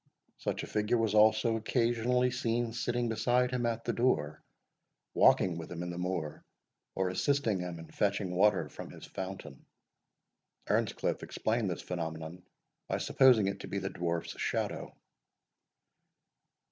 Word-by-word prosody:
Such - - -2
a - - -6
figure 105 +3 +1
was 110 -2 +1
also 110 +1 +4
occasionally 120 +2 +1
seen 120 -1 -1
sitting 120 0 -1
beside 125 +3 +2
him 125 -2 0
at 115 0 -2
the - - 0
door, 75 - +1 0.7
walking 85 -3 +4
with 80 - -8
him 85 0 -4
in 90 - -4
the 85 - -5
moor, 90 -4 -3 0.5
or 95 -1 +1
assisting 110 +2 +1
him 90 -1 -4
in 80 0 -10
fetching 100 -3 0
water 105 +3 +3
from - - -9
his - - -11
fountain. 95 -8 -7 1.0
Earnscliff - - 0
explained 110 -2 -1
this 90 - -4
phenomenon 80 0 -5 0.5
by - - -1
supposing 125 -6 +5
it 100 - -2
to - - -7
be 100 - -3
the 95 0 -3
Dwarf's 85 -1 -3
shadow. - - -2
105 Hz, 145 wpm, -31 LUFS, 90-120 Hz, 1.0 s, supposing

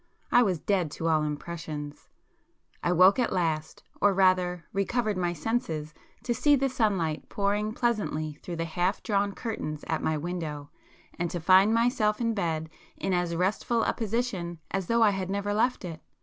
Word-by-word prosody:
I 245 - +6
was 190 -7 +2
dead 185 -4 0
to 165 - -1
all 155 -1 +3
impressions. 150 -1 -5 0.7
I 175 - +1
woke 185 +5 +6
at 245 - +1
last, 160 -4 -1 0.2
or 205 -1 +4
rather 180 -2 +2
recovered 215 +2 0
my 175 -1 0
senses 160 -4 -2 0.3
to 240 - 0
see 290 +5 +4
the 270 0 +1
sunlight 195 -11 0
pouring 205 +1 0
pleasantly 200 -11 -1
through 175 - -5
the 165 0 -2
half 175 +4 -1
drawn 200 -2 +1
curtains 155 -10 -4
at 160 - -1
my 160 -1 0
window, 150 -3 -5 0.5
and 175 0 0
to 175 +1 -3
find 190 +5 +6
myself 230 -2 +2
in 230 -1 +1
bed 160 -6 -1 0.3
in 190 - -1
as 175 -1 0
restful 210 +6 +1
a - - +1
position 215 -7 -2
as 190 -2 -2
though 230 0 +3
I 210 - +5
had 190 -2 -3
never 200 +1 -1
left 235 +1 +1
it. 165 -3 -7
185 Hz, 175 wpm, -28 LUFS, 165-215 Hz, 0.7 s, I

